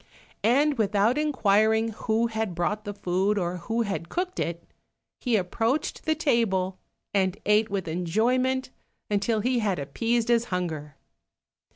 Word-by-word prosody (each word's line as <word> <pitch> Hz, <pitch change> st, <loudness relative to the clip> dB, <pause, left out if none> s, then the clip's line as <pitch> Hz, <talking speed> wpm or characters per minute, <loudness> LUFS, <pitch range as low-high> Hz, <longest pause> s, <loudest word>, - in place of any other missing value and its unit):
And 275 Hz, +4 st, +3 dB
without 210 Hz, +2 st, +3 dB
inquiring 220 Hz, -6 st, +3 dB
who 220 Hz, +1 st, 0 dB
had 220 Hz, -5 st, -2 dB
brought 210 Hz, +5 st, -1 dB
the 205 Hz, -, -4 dB
food, 190 Hz, +2 st, 0 dB
or 180 Hz, -1 st, -1 dB
who 225 Hz, +7 st, -1 dB
had 195 Hz, -5 st, -4 dB
cooked 365 Hz, +1 st, -3 dB
it, 170 Hz, 0 st, -2 dB, 0.6 s
he 245 Hz, -3 st, +1 dB
approached 225 Hz, +8 st, -1 dB
the 315 Hz, 0 st, +2 dB
table, 200 Hz, -, +1 dB, 0.3 s
and 190 Hz, -1 st, +1 dB
ate 210 Hz, +1 st, +3 dB
with 195 Hz, -3 st, -2 dB
enjoyment 240 Hz, +11 st, 0 dB, 0.4 s
until 210 Hz, +2 st, +1 dB
he 250 Hz, +2 st, +1 dB
had 205 Hz, -5 st, 0 dB
appeased 230 Hz, -, -1 dB
his 235 Hz, -1 st, +3 dB
hunger. 160 Hz, -, -3 dB
215 Hz, 140 wpm, -26 LUFS, 185-235 Hz, 0.6 s, And